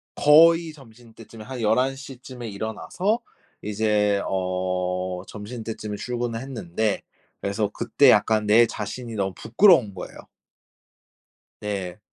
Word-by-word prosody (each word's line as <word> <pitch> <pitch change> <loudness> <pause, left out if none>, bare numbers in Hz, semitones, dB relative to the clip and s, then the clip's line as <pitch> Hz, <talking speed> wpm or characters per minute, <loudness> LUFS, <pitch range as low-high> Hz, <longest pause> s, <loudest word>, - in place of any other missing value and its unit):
거의 165 +2 +5
점심때쯤에 115 -4 -14
한 125 +1 -7
11:00쯤에 130 +1 -2
일어나서 110 - -2 0.4
이제 105 -1 +1
어 90 -1 -2
점심때쯤에 110 -1 -6
출근을 120 0 -3
했는데 110 -5 -2 0.4
그래서 100 +1 -1
그때 120 +4 +3
약간 110 -1 +3
내 110 +3 +6
자신이 115 +2 -6
너무 95 -2 -1
부끄러운 125 - +4
거예요. 90 - -9 1.4
네. 100 -2 -4
110 Hz, 240 characters per minute, -24 LUFS, 100-125 Hz, 1.4 s, 내